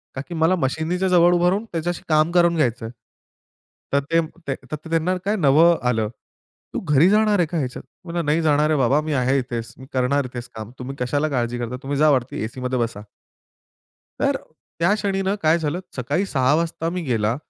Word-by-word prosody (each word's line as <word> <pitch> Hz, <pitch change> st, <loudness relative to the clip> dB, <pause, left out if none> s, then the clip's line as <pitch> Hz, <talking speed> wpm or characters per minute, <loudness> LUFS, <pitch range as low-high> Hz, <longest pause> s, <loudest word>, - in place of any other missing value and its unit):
का 130 Hz, -, -3 dB
की 175 Hz, -, -7 dB
मला 160 Hz, +3 st, +3 dB
मशिनीच्या 165 Hz, +5 st, -1 dB
जवळ 175 Hz, -1 st, +5 dB
उभं 175 Hz, 0 st, +3 dB
राहून 205 Hz, +4 st, -1 dB
त्याच्याशी 170 Hz, +1 st, -3 dB
काम 155 Hz, +2 st, +3 dB
करून 170 Hz, -1 st, +4 dB
घ्यायच 125 Hz, -7 st, 0 dB
आहे. 115 Hz, -, -5 dB, 1.0 s
तर 140 Hz, -, +4 dB
ते 165 Hz, -, +4 dB, 0.5 s
तर -, -, -1 dB
त्यांना 165 Hz, +3 st, +1 dB
काय 205 Hz, +2 st, +1 dB
नवलं 165 Hz, +1 st, +5 dB
आलं. 110 Hz, -3 st, 0 dB, 0.6 s
"तू -, -, -1 dB
घरी 150 Hz, +5 st, +4 dB
जाणार 210 Hz, -1 st, +3 dB
आहे 170 Hz, -, +4 dB
का 170 Hz, +2 st, -3 dB
ह्याच्यात?" 130 Hz, -4 st, -3 dB, 0.2 s
म्हणलं, 170 Hz, -1 st, -3 dB
"नाही 150 Hz, +3 st, +2 dB
जाणार 150 Hz, -1 st, +3 dB
आहे 155 Hz, -, +2 dB
बाबा, 135 Hz, +4 st, +3 dB
मी 155 Hz, -1 st, -3 dB
आहे 130 Hz, +1 st, +2 dB
इथेच, 115 Hz, -2 st, -5 dB
मी 130 Hz, -, -11 dB
करणार 130 Hz, +2 st, +1 dB
इथेच 120 Hz, -1 st, -7 dB
काम 110 Hz, +1 st, -7 dB
तुम्ही 135 Hz, +2 st, -6 dB
कशाला 145 Hz, +5 st, 0 dB
काळजी 120 Hz, -2 st, -1 dB
करता? 120 Hz, +1 st, -4 dB
तुम्ही 140 Hz, +1 st, -2 dB
जा 155 Hz, +1 st, +5 dB
वरती 125 Hz, -4 st, -1 dB
ए-सीमध्ये 125 Hz, +2 st, -3 dB
बसा." 115 Hz, -3 st, -2 dB, 1.2 s
तर -, -, +2 dB, 0.4 s
त्या 175 Hz, +5 st, +3 dB
क्षणी 200 Hz, -2 st, -1 dB
ना 195 Hz, +1 st, 0 dB
काय 160 Hz, +2 st, +4 dB
झालं, 160 Hz, +3 st, -2 dB, 0.2 s
सकाळी 145 Hz, +10 st, -1 dB
6:00 135 Hz, -3 st, +2 dB
वाजता 165 Hz, 0 st, -1 dB
मी 180 Hz, 0 st, -3 dB
गेला. 115 Hz, -4 st, 0 dB
150 Hz, 195 wpm, -22 LUFS, 125-170 Hz, 1.2 s, जवळ